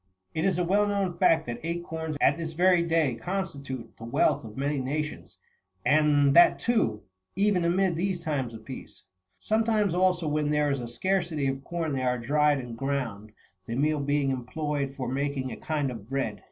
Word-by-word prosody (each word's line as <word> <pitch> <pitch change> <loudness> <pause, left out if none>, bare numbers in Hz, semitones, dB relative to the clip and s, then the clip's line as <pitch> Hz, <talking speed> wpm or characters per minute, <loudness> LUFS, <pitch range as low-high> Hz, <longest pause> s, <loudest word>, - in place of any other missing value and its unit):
It 160 - -1
is 190 -3 +2
a 180 - +1
well 205 +4 +2
known 200 -4 -1
fact 165 -3 +4
that 120 0 -5
acorns39 160 -2 -4
at 145 - +5
this 165 -1 -5
very 180 +1 +4
day 165 -5 +2
con 185 +12 -2
stitute 140 -8 -8
the - - -11
wealth 115 - +1
of 110 0 -10
many 140 +1 0
nations, 150 +3 -4 0.5
and 145 -2 +4
that, 175 - +7
too^ 120 - +1 0.3
even 195 -2 +2
amid 180 +1 +2
these 180 +1 -1
times 135 -8 -2
of 110 - -12
peace. 130 - -10 0.4
Sometimes, 215 - +1
also, 180 -2 +2
when 150 0 0
there 150 -1 +2
is 140 - -1
a 120 - -5
scarcity 170 +3 -1
of 135 0 -2
corn 165 -1 -3
they 135 - -1
are 125 -1 +1
dried 145 +4 +2
and 120 -3 -6
ground, 115 -6 -3 0.4
the 115 - -3
meal 150 +2 +1
heing 145 -1 +1
employed 140 +2 -3
for 130 - -4
making 135 0 -2
a - - -5
kind 145 -4 -2
of 115 -2 -9
bread. 125 -7 -2
150 Hz, 190 wpm, -27 LUFS, 130-170 Hz, 0.5 s, that